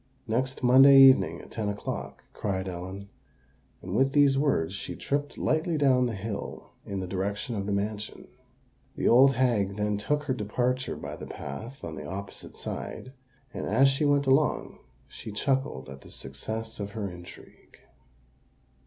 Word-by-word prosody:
"Next 130 +4 -1
Monday 135 +3 +8
evening 135 -1 +6
at - - -15
ten 110 -3 -2
o'clock," 100 0 -5
cried 95 -2 -2
Ellen; 95 +2 -7 0.7
and 90 +2 -4
with 135 +3 +3
these 145 -2 +5
words 135 - +1
she 100 - -6
tripped 145 +1 -3
lightly 160 +1 0
down 130 -3 +3
the 115 - -3
hill 100 +1 -6 0.2
in 100 -1 -3
the 95 - -4
direction 100 +5 -3
of 100 -1 -3
the - - -1
mansion. 105 +1 -3 0.7
The - - 0
old 135 +3 +6
hag 110 -6 +1
then 105 0 -1
took 150 +7 0
her 140 -3 -1
departure 125 +3 -1
by - - -7
the - - -8
path 115 - -8
on 80 - -5
the - - -7
opposite 100 +2 -8
side; 130 - -6 0.4
and, - - -4
as 130 +7 +5
she 135 +2 0
went 145 -1 +3
along, 135 0 +1 0.3
she 110 - -9
chuckled 130 - -1
at 70 +1 -10
the - - -14
success 110 +13 -6
of 100 0 -5
her 105 -3 -3
intrigue. 90 -1 -13
110 Hz, 160 wpm, -28 LUFS, 100-135 Hz, 0.7 s, Monday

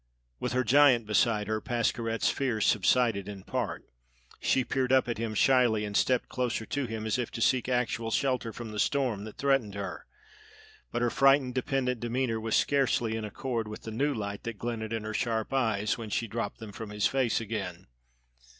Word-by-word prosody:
With - - -2
her 130 0 +2
giant 130 -1 +5
beside 105 0 +2
her, 110 +1 -2
Pascherette's 115 -2 0
fears 120 -6 0
subsided 110 -1 +2
in 100 -2 -8
part. - - -3 0.5
She 130 - +2
peered 130 -1 0
up 130 -1 +4
at 120 -2 -3
him 115 -2 -3
shyly 120 -4 +3
and 105 -1 -5
stepped 125 +3 +2
closer 120 -3 -2
to 140 +1 -2
him, 110 -1 -5
as 110 +3 0
if 120 - -2
to - - -5
seek 125 +2 +2
actual 120 -2 0
shelter 125 -2 0
from 115 -1 -7
the 105 - -5
storm 125 -8 0
that 110 - -10
threatened 135 -7 +1
her; 100 -1 -6 0.8
but 120 0 -1
her 120 - +2
frightened, 135 -1 +4
dependent 125 -1 -1
demeanor 120 -1 -1
was 110 0 -1
scarcely 130 -5 +2
in 110 - -3
accord 115 +1 -3
with 105 - -8
the 110 - -6
new 140 +7 +1
light 100 -5 -4
that 115 -2 -6
glinted 115 -1 -4
in 115 -1 -2
her 110 0 -4
sharp 115 0 -1
eyes 110 -5 +1
when 110 -2 -6
she 115 - -1
dropped 110 -1 -4
them 110 -2 -9
from 110 +1 -7
his 105 0 -1
face 130 -4 +2
again. 100 -5 -5
115 Hz, 195 wpm, -29 LUFS, 110-125 Hz, 0.8 s, giant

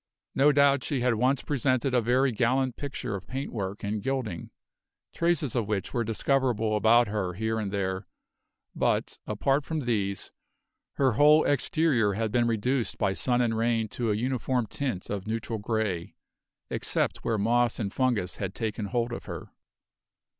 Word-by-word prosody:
No 145 +2 +5
doubt 140 -2 +4
she 140 -4 -1
had 125 -1 +3
once 130 +4 +1
presented 130 -2 0
a 125 - +4
very 130 +4 +2
gallant 125 +3 +1
picture 135 -5 -5
of 95 -2 -6
paintwork 110 -7 -4
and 105 +1 -2
gilding, 115 -8 -3 0.6
traces 170 -7 +1
of 115 -4 0
which 105 -3 -2
were 120 -3 +1
discoverable 115 -1 +1
about 115 +3 +5
her 100 -3 -2
here 110 +2 -1
and 100 -3 -3
there, 95 -1 -2 0.7
but, - - 0
apart 135 +7 +1
from 160 +1 -3
these, 100 -6 -1 0.6
her 135 -2 +2
whole 150 +7 +5
exterior 140 -7 +2
had 110 +1 -1
been 120 +1 +2
reduced 120 +2 0
by 100 -2 +1
sun 125 +4 +1
and 115 -2 +1
rain 115 0 +1
to 120 +1 -2
a 105 - +2
uniform 125 +1 0
tint 120 -4 -4
of 100 -1 -4
neutral 110 0 -3
grey, 105 -5 -2 0.6
except - - 0
where 115 - -1
moss 120 +3 +2
and 105 -2 -3
fungus 120 -9 0
had 95 -1 -4
taken 110 -2 -3
hold 120 +2 -1
of - - -6
her. - - -7
115 Hz, 160 wpm, -27 LUFS, 105-130 Hz, 0.7 s, No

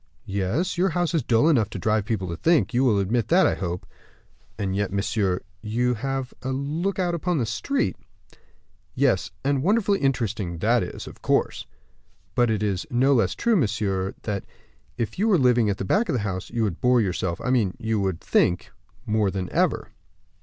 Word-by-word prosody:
"Yes; 100 - -1
your 190 +2 +3
house 175 -1 0
is 165 - +2
dull 115 +3 +3
enough 120 -10 +3
to - - -6
drive 110 -2 +1
people 105 -5 -2
to 85 - -3
think; 130 - +2
you 125 +2 +3
will 115 -6 +3
admit 105 +3 0
that, 185 +3 +5
I - - +3
hope." 90 -2 -4 0.7
"And 95 -2 -2
yet, 100 -1 -1
monsieur, 100 -1 0 0.2
you 120 +4 0
have 135 +2 -3
a 130 - -4
look 150 +9 -2
out 180 -2 0
upon 170 +1 -1
the 125 - +1
street." 270 - -1 1.0
"Yes; - - +2
and 140 -1 +1
wonderfully 200 +3 +2
interesting 110 -10 -1
that - - +2
is, - - -5
of - - -12
course." - - 0 0.7
"But 120 -1 +3
it 105 -2 0
is 100 -3 -1
no 130 +3 +3
less 120 - +2
true, 235 -1 +2
monsieur, 100 - 0
that, 100 -3 -3 0.5
if 115 - -3
you 215 - +2
were 205 -5 +5
living 125 -5 +3
at 100 - -1
the - - -4
back 210 - +1
of - - +1
the 120 - 0
house, 95 -2 -4
you 115 - -1
would 95 -6 -2
bore 125 0 +4
yourself 90 -4 -1
I 125 - -1
mean, 110 -8 +1
you 110 -1 -1
would 95 -4 -1
think 90 - +1 0.3
more 105 -2 +1
than 95 -1 -4
ever." - - +1
115 Hz, 195 wpm, -24 LUFS, 100-140 Hz, 1.0 s, that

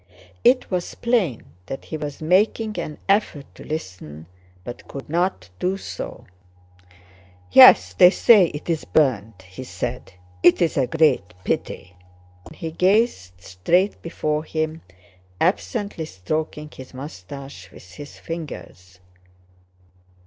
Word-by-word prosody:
It 250 -1 +3
was 180 -1 -3
plain 225 - 0 0.2
that 135 - -7
he - - -6
was 150 -1 -6
making 210 +5 +1
an 150 - -5
effort 195 -8 +1
to - - -13
listen, 90 - -7 0.4
but 120 - -9
could 140 - -8
not 165 - -1
do 190 +2 -1
so. - - -8 1.3
"Yes, 90 -1 +8
they 180 - +7
say 205 0 +6
it's 160 +1 -4
burned," 115 -9 0
he 95 +8 -9
said. 125 -4 -6 0.3
"It's 175 - +4
a 135 -3 +1
great 125 - +1
pity," 90 0 -4 0.5
and - - -13
he 165 - -6
gazed 180 - +1
straight 175 - 0
before 155 -2 -2
him, 155 0 -3 0.6
absently 155 - -1
stroking 150 +8 -4
his 130 0 -12
mustache 130 -4 -9
with 90 +1 -15
his 145 +9 -11
fingers. 115 - -9
150 Hz, 120 wpm, -22 LUFS, -, 1.3 s, Yes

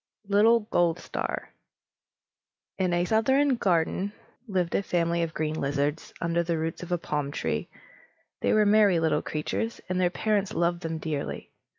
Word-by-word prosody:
LITTLE 220 +3 +5
GOLDSTAR 175 0 0 1.5
(Adapted) 190 - +2
In 180 - 0
a 175 0 +2
southern 265 +7 +3
garden 185 +1 +1 0.3
lived 180 -4 -1
a - - +2
family 170 -2 0
of 165 -1 -3
green 155 0 -1
lizards, 145 +2 -1
under 170 0 +1
the 170 -1 -1
roots 160 0 -3
of 180 - -8
a 175 - +2
palm 150 -3 -2
tree. 145 - -2 0.7
They - - +1
were 215 -1 +4
merry 205 -4 +5
little 160 -1 +1
creatures, 225 +9 -3
and 185 0 0
their 180 - +3
parents 205 +1 0
loved 170 0 +1
them 165 -1 -3
dearly. 155 -3 -4
175 Hz, 160 wpm, -27 LUFS, 160-200 Hz, 1.5 s, LITTLE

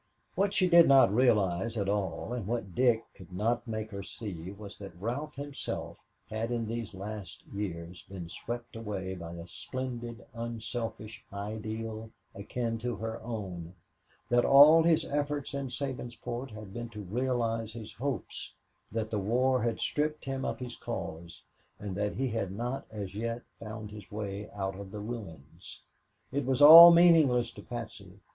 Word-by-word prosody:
What 200 0 +1
she 185 - +4
did 170 -1 +8
not 135 -7 +6
realize 110 -3 +2
at 100 -2 -1
all, 100 +3 -1
and 115 -6 -4
what 110 -5 -3
Dick 120 0 +3
could 95 -1 -14
not 115 +7 0
make 110 -1 -4
her 100 -1 -5
see, 95 -4 -7
was 100 0 -10
that 95 -4 -10
Ralph 135 +9 -3
himself 140 0 -5 0.3
had 110 +2 -3
in 120 -2 -1
these 115 -2 -4
last 100 +1 -7
years 90 -4 -5
been 95 -3 -8
swept 120 +7 -6
away 100 -4 -4
by 85 -2 -7
a 85 -1 -8
splendid, 120 +3 -6
unselfish 115 -2 -5
ideal 110 +2 -5 0.2
akin 115 +3 -3
to 120 0 -2
her 110 +1 -5
own, 95 -7 -6 0.5
that 120 0 +3
all 150 +4 +9
his 165 -1 +3
efforts 145 -1 -2
in 140 -1 -2
Sabinsport 125 -1 -5
had 110 -3 -10
been 120 +1 -5
to 105 -2 -8
realize 115 +1 -1
his 110 -2 -8
hopes, 140 +3 -4 0.4
that 110 0 -2
the 105 - 0
war 125 +5 +2
had 115 0 -1
stripped 150 +1 -1
him 135 -1 -3
of - - -2
his 125 -2 -6
cause, 85 -6 -6 0.3
and 100 -3 -5
that 105 +1 -1
he 135 +1 0
had 110 -4 -2
not 120 +7 -4
as 105 -3 -6
yet 115 +3 -3 0.2
found 110 -1 -7
his 105 -2 -11
way 105 -1 -5
out 95 -1 -3
of 100 -1 -8
the 105 +1 -7
ruins. 105 - -8 0.5
It 140 +2 0
was 130 0 +1
all 165 +4 +13
meaningless 165 -8 +5
to - - -11
Patsy. 110 -5 -8
115 Hz, 165 wpm, -30 LUFS, 100-125 Hz, 0.5 s, all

